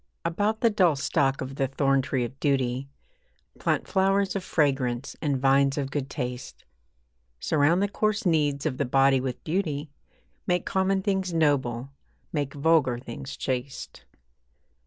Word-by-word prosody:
About 205 +6 0
the 230 - +4
dull 180 -7 +3
stalk 135 0 0
of 135 +1 -6
the 135 - +1
thorntree 135 -2 +1
of 130 +3 -10
duty 135 -2 0 0.7
Plant - - 0
flowers 195 0 +2
of 195 - -2
fragrance 135 -6 0
and 145 -4 0
vines 135 +1 +3
of 140 -1 -2
good 140 -2 -3
taste. 125 -2 -6 0.7
Surround 160 - +2
the - - +2
coarse 215 0 -1
needs 150 -4 +1
of 140 -5 -1
the 140 - +1
body 135 +1 +3
with 125 -1 -4
beauty, 155 -4 -2 0.6
Make 180 -1 +1
common 190 0 +1
things 190 -3 -1
noble, 135 -5 +1 0.4
make 145 -3 -2
vulgar 145 -4 +3
things 125 +2 -8
chaste. 130 +1 -4
140 Hz, 140 wpm, -26 LUFS, 135-170 Hz, 0.7 s, the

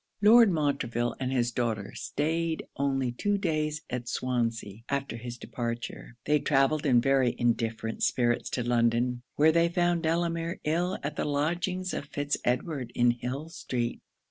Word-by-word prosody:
Lord 225 +1 +8
Montreville 140 -7 0
and 130 -1 -2
his 120 -2 +1
daughter 110 -4 -2
staid 160 +2 -2
only 135 -2 0
two 205 +12 0
days 155 -4 -1
at 120 -1 -4
Swansea 115 -5 -2
after 140 -3 -2
his 120 +1 -7
departure. 120 0 -5
They 150 0 +3
travelled 145 +2 +2
in 125 -3 +5
very 130 -1 +2
indifferent 115 -1 -1
spirits 120 -1 +1
to 125 -2 -2
London; 120 +1 +2
where 155 +2 +5
they 170 +1 +3
found 175 -1 +1
Delamere 165 0 -1
ill 175 +5 0
at 145 +1 -4
the - - 0
lodgings 175 +6 -1
of - - -3
Fitz 145 0 -1
Edward 125 0 -1
in 120 0 +4
Hill 125 +6 -5
street. 120 -7 -3
135 Hz, 150 wpm, -28 LUFS, 120-160 Hz, -, Lord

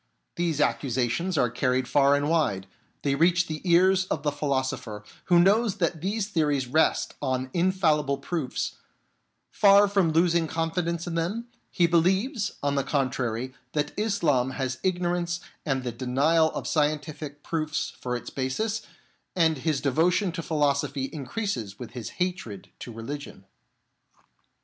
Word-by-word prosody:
These 170 -4 -1
accusations 135 +7 0
are 120 -4 +2
carried 125 +1 0
far 140 +1 +4
and 145 0 0
wide, 150 - +1 0.4
they 140 - +1
reach 170 +4 +3
the 155 -2 -5
ears 185 +1 +4
of 155 -5 -3
the 145 - +1
philosopher 130 -7 -2 0.2
who 175 -1 +5
knows 205 +4 +4
that 170 -4 -1
these 200 +3 -1
theories 150 -8 +1
rest 155 +6 +1
on 130 -2 -2
infallible 160 -6 +2
proofs; 140 -1 -3 0.7
far 200 0 +6
from 195 -5 +2
losing 165 0 +3
confidence 165 +1 -2
in 175 - -4
them, 200 +9 -2 0.2
he 175 - +2
believes, 190 - +1
on 145 0 +1
the 140 -1 +1
contrary, 130 -3 -1 0.2
that 150 -1 -1
Islam 155 - +1
has 130 -2 -2
ignorance 175 -1 0 0.3
and 135 -2 0
the 125 - -2
denial 140 +7 +2
of - - -4
scientific 150 -1 -2
proofs 155 -2 -2
for 125 -1 -2
its 120 - -6
basis, 210 +12 -2 0.5
and 160 -5 +2
his 150 -1 0
devotion 170 +7 +2
to 165 0 -4
philosophy 140 -3 0
increases 135 - -4
with 120 - -8
his 120 -4 -6
hatred 175 - -3
to 120 - -8
religion. 115 -2 -7
155 Hz, 140 wpm, -26 LUFS, 135-175 Hz, 0.7 s, far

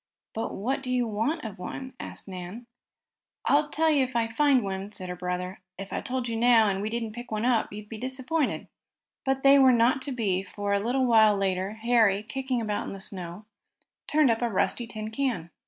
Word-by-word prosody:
"But 225 - -3
what 260 +7 -1
do 255 -1 -4
you 250 -1 +2
want 225 +9 -1
of 200 -4 -7
one?" 260 +8 -6
asked - - -7
Nan. 185 +5 -7 0.8
"I'll 295 +1 +3
tell 320 +2 +2
you 285 -3 +4
if 260 -1 -5
I 230 -1 +2
find 265 +2 +3
one," 195 +1 -4
said 185 -3 -5
her 180 - -4
brother. 180 +1 -4 0.2
"If 195 +1 -7
I - - -1
told 255 -1 -3
you 230 - -2
now, 230 -1 +5
and 195 0 -1
we 210 - -2
didn't 230 -1 -3
pick 240 +3 -8
up - - -20
one, 230 +2 +2
you'd 210 +1 -9
be 220 0 -8
disappointed." 260 +4 -2 0.6
But 270 0 +1
they 275 0 +7
were 265 -1 +7
not 245 +3 +3
to 275 - -3
be, 205 -7 0
for 200 +1 -3
a 200 - +3
little 250 +5 +1 0.3
later 190 0 -1
Harry, 220 -3 +3
kicking 260 +2 -2
about 210 -2 -2
in - - -5
the 195 - -8
snow, 185 0 -7 0.6
turned 300 -4 +4
up 225 - -1
a 240 - +1
rusty 230 +3 0
tin 215 -1 -6
can. 230 -10 -2
225 Hz, 210 wpm, -27 LUFS, 200-260 Hz, 0.8 s, they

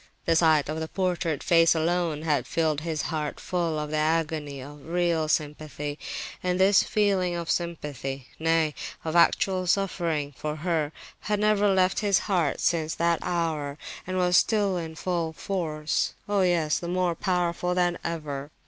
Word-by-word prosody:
The 165 - +3
sight 160 -3 +4
of 155 +2 -3
the 160 - -3
portrait 175 -5 -1
face 165 -1 +5
alone 165 -1 0
had 150 -3 0
filled 155 -2 0
his 160 -1 -2
heart 150 -2 -3
full 170 -3 -1
of 150 0 -4
the 155 - 0
agony 155 -2 0
of 145 +2 -10
real 170 -2 0
sympathy; 150 -1 -2 0.4
and 180 0 0
this 195 +1 +6
feeling 195 -4 +1
of 170 -1 -2
sympathy, 145 -6 -3
nay, 165 -1 +2 0.3
of 160 +1 -2
actual 185 +2 +3
suffering, 170 -6 0
for 150 +3 -4
her, 155 -2 -1 0.3
had 210 -1 -1
never 210 -1 +3
left 185 -1 +2
his 200 -3 +3
heart 180 -7 0
since 160 -2 0
that 170 0 +1
hour, 155 -5 -2 0.3
and 185 0 -2
was 180 -1 +4
still 205 -4 +2
in 165 -2 -4
full 170 -2 -2
force. 155 -4 -2
Oh 205 -1 +2
yes, 170 -4 +2
and 175 0 -3
more 180 -2 +1
powerful 180 0 0
than 175 -1 +1
ever! 150 -4 -4
165 Hz, 160 wpm, -26 LUFS, 155-180 Hz, 0.4 s, this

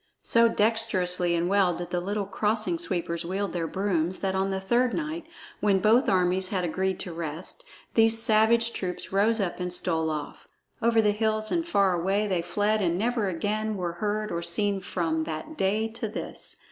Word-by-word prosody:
So 230 0 +4
dextrously 190 -6 +2
and 170 +1 0
well 190 -2 +3
did 175 +1 -6
the 180 - 0
little 200 +2 -2
Crossing 215 - 0
Sweepers 170 - -2
wield 190 +3 -3
their 170 -2 -2
brooms 185 -2 -1
that 190 -1 -2
on 190 +1 0
the 190 0 -1
third 240 +6 +1
night, 320 +1 -4 0.3
when 200 -2 +3
both 220 +7 +4
armies 185 0 +2
had 190 -3 -1
agreed 185 +2 -1
to 175 - -5
rest, 165 - -5 0.3
these 225 0 +4
savage 225 +1 +3
troops 180 -2 -5
rose 220 +3 +3
up 190 -3 -2
and 180 0 -3
stole 165 -2 0
off. 150 -2 -6 0.3
Over 230 -1 +3
the 210 - +4
hills 215 0 0
and 340 -1 +1
far 200 - +2
away 195 +4 0
they 185 -4 0
fled 205 +5 0
and 175 -2 +1
never 225 0 0
again 210 +4 -2
were 175 -2 -3
heard 210 +3 -2
or 170 - -2
seen 200 +4 0
from 165 -4 -1
that 165 - -6
day 210 0 +1
to 225 0 -4
this. 215 - -6
195 Hz, 185 wpm, -27 LUFS, 180-220 Hz, 0.3 s, So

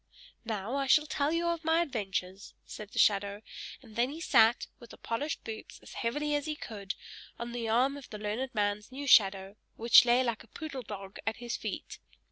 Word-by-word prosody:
"Now 220 +3 -3
I 275 -1 -1
shall 300 +3 +5
tell 285 0 0
you 340 0 0
my 325 +1 +3
adventures," 195 - -4
said 210 -1 -8
the 235 - -11
shadow; 200 -1 +2 0.4
and 220 -4 -15
then 240 +3 +2
he 305 +3 -7
sat, 230 -7 +4
with 235 - -13
the - - -12
polished 285 +7 -3
boots, 220 -1 -8
as - - -12
heavily 295 +6 -1
as 290 +1 -1
he 305 - -2
could, 200 -8 -6 0.4
on 235 0 -5
the 235 -2 -3
arm 260 +5 +2
of 280 - -11
the 210 - -6
learned 220 +5 -3
man's 205 +1 -1
new 280 +2 -6
shadow, 195 -5 +4 0.2
which 230 +1 +7
lay 245 +1 +4
like 235 -3 -2
a - - -20
poodle 275 +2 -6
dog 200 -3 -8
at 220 - 0
his 240 0 -4
feet. - - -6
235 Hz, 200 wpm, -31 LUFS, 210-275 Hz, 0.4 s, which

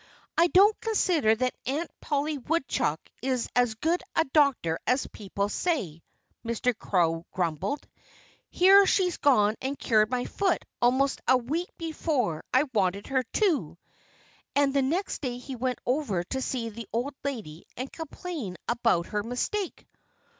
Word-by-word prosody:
"I 335 +1 +5
don't 410 +5 +5
consider 360 - +2
that 255 +2 0
Aunt 300 +6 -2
Polly 290 0 -1
Woodchuck 260 - 0 0.2
is 255 -2 0
as 245 -2 +3
good 330 +9 0
a 325 - +4
doctor 275 - +3
as 255 +2 +2
people 200 -1 -3
say," 205 - -2 0.4
Mr. 235 +1 0
Crow 170 -5 0
grumbled. 185 - -2 0.6
"Here 390 +2 +6
she's 360 -3 +2
gone 215 -7 +4
and 270 +2 -3
cured 215 -2 +3
my 245 0 -1
foot 380 -3 0 0.2
almost 260 +3 +2
a 260 - +6
week 305 +9 -3
before 300 - -1
I 260 +2 +4
wanted 200 -1 +1
her 265 -1 +2
to!" 360 - 0 0.8
And 280 -1 +3
the 280 - +3
next 335 +10 -1
day 250 -4 -3
he 260 +1 -7
went 250 0 -1
over 245 - 0
to 265 +9 -4
see 240 -3 -2
the 225 0 -8
old 245 +6 -2
lady 215 - -5
and 255 +2 -5
complain 320 - -6
about 230 -8 +2
her 210 +2 -2
mistake. 250 - -3
255 Hz, 145 wpm, -27 LUFS, 215-310 Hz, 0.8 s, Here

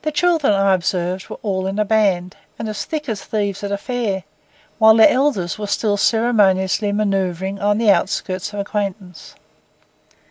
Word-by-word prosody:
The 310 - -1
children, 325 -4 +2
I 195 -1 +3
observed, 180 0 -2
were - - -7
all 190 -3 -2
in 195 +1 -3
a 210 - +1
band, 195 -4 +1 0.2
and 225 - -5
as 215 -1 -4
thick 305 -2 -5
as 220 -4 -4
thieves 205 -2 -3
at 200 - -3
a 200 - 0
fair, 210 -4 -3 0.6
while 220 -1 +7
their 220 - +7
elders 250 -10 0
were 210 - -4
still 205 0 0
ceremoniously 205 -3 +2
manœuvring 195 -2 -1
on 205 +1 +2
the 220 -2 +4
outskirts 190 0 -1
of 205 - -6
acquaintance. 200 -3 -5
205 Hz, 170 wpm, -19 LUFS, 190-220 Hz, 0.6 s, while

